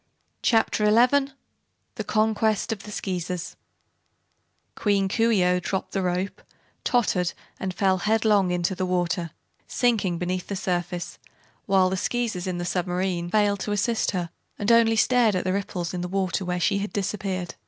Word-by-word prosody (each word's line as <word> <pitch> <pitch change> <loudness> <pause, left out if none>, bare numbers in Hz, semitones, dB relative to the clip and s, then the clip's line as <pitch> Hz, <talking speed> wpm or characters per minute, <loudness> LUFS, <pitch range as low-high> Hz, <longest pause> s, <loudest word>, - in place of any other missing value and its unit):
Chapter 225 -2 +2
Eleven 250 +6 +4 0.6
The - - -4
Conquest 220 0 +1
of 215 -3 -3
the 210 - -10
Skeezers 180 -3 -4 1.2
Queen 200 -2 +1
Coo 225 +4 +2
ee 205 -5 +3
oh 180 0 +3
dropped 190 +1 -3
the 195 - -1
rope, 180 +2 -2 0.4
tottered 185 -8 +1 0.3
and 190 - -2
fell 190 +1 +1
headlong 210 -1 +3
into 180 +1 0
the 185 0 -2
water, 175 -1 0 0.4
sinking 215 -8 +1
beneath 180 +1 -3
the 200 - -3
surface, 175 -1 -3 0.5
while 190 -2 +4
the 190 - -1
Skeezers 225 -4 -2
in 180 -1 -2
the 175 - -3
submarine 180 0 -1
were - - -6
too - - -14
bewildered 205 -2 +2
toassist 215 +2 0
her 175 -3 -2 0.3
and 205 +3 +1
only 230 -1 +5
stared 230 -2 +3
at 180 - 0
the 185 - 0
ripples 185 -3 -3
in 180 - -3
the 180 - -3
water 190 +1 -1
where 180 0 -2
she 200 +3 +1
had 205 +1 -3
disappeared. 195 -3 -3
190 Hz, 165 wpm, -25 LUFS, 180-215 Hz, 1.2 s, only